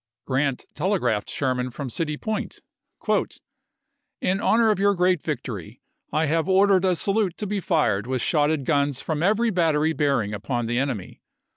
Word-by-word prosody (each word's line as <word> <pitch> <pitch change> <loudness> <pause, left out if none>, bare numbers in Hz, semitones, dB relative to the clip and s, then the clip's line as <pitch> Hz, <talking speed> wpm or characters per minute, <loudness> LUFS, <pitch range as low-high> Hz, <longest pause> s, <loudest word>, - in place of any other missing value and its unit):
Grant 135 0 -1
telegraphed 145 - 0
Sherman 125 -2 -1
from 130 +1 -6
City 150 +2 -2
Point, 220 +4 -4 0.2
" - - -29 1.1
In 190 +2 0
honor 225 0 +4
of 210 - -1
your 200 0 +3
great 180 -2 +2
victory, 120 - -5 0.3
I 155 +1 +1
have 160 +4 0
ordered 190 0 +4
a 185 -1 +3
salute 195 +2 0
to 210 - -4
be 205 0 -2
fired 120 - +1
with 130 -2 -1
shotted 150 -2 +1
guns 140 -2 +1
from 155 -2 -3
every 220 +5 +2
battery 160 -4 +2
bearing 140 -9 0
upon 120 +3 -2
the 120 +2 0
enemy. 130 -9 -4
150 Hz, 160 wpm, -24 LUFS, 130-190 Hz, 1.1 s, honor